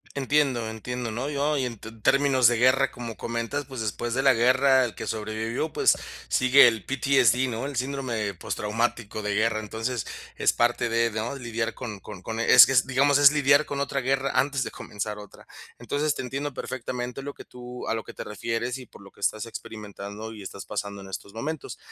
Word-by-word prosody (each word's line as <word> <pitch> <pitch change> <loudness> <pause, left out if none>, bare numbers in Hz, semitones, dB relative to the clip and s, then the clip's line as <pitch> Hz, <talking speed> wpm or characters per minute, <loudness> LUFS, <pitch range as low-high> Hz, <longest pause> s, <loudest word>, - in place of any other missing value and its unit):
Entiendo. 135 -4 +1
Entiendo, 120 +2 -5
¿no?, 120 +5 -3
yo 145 +1 0
y 130 - 0
en 115 -4 -6
t 115 - -9
términos 130 +3 +3
de 120 0 +3
guerra, 130 +2 +4
como 120 -2 -7
comentas, 115 +5 -3
pues, 130 -3 -6
después 110 +3 -3
de 135 - +1
la 135 -1 +5
guerra 130 +2 +4
el 115 - -5
que - - -7
sobrevivió, 110 +6 -3
pues, - - +4 0.3
sigue 130 +2 +6
el 115 -4 0
PTSD, 130 -2 +3
¿no? 115 +2 -3
el 140 0 -5
síndrome 125 -6 -2
postraumático 110 +3 -2
de 105 0 -1
guerra. 110 +1 +1
Entonces 115 +2 -3 0.3
es - - +2
parte 120 0 +1
de, 115 0 +2
¿no?, 110 +4 -3
lidiar 120 -3 -3
con 110 -5 -7
con 100 -1 -10
con 110 +4 -5
es 120 +1 +8
que 135 - 0
digamos 140 +2 +3
es 145 0 +8
lidiar 145 0 +4
con 140 - -4
otra 140 0 -1
guerra 135 +1 0
antes 135 +1 +2
de - - -4
comenzar 105 +1 -5
otra. 105 -1 -13 0.3
Entonces, 145 +6 0
te - - -5
entiendo 135 +3 -4
perfectamente 125 0 -5
lo 145 0 -5
que - - -11
tú 125 0 -9
a - - 0
lo 110 - -4
que - - -11
te - - -6
refieres 115 +3 -3
y 130 - -10
por - - -16
lo - - -14
lo 100 - -14
que - - -23
estás 110 +2 -1
experimentando 105 -1 -8
y 105 - -10
estás 100 +1 -8
pasando 100 -1 -5
en 95 - -11
estos 100 +1 -7
momentos. 145 +7 -5
120 Hz, 210 wpm, -26 LUFS, 110-135 Hz, 0.3 s, es